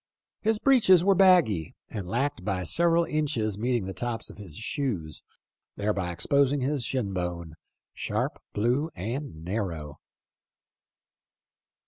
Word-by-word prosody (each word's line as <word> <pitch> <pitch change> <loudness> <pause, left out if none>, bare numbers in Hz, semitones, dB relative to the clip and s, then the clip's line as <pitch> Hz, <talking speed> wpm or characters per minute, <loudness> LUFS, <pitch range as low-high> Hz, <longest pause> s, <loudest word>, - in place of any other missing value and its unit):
His 220 0 +2
breeches 210 -9 +5
were 195 +1 +5
baggy 175 - +4
and 100 -5 -6
lacked 135 +6 -1
by 95 -3 -1
several 170 - +3
inches 130 -10 -1
meeting 120 -3 0
the 95 - -5
tops 120 +1 -4
of - - -15
his 90 -7 -8
shoes, 110 - -3 0.5
thereby 100 -4 -1
exposing 140 +9 +2
his 135 0 0
shin 120 -6 -2
bone, 85 -3 -4 0.2
" - - -61
sharp, - - -2
blue, 125 +9 +1
and 105 - -5
narrow." 85 -7 -4
115 Hz, 125 wpm, -27 LUFS, 90-145 Hz, 0.5 s, breeches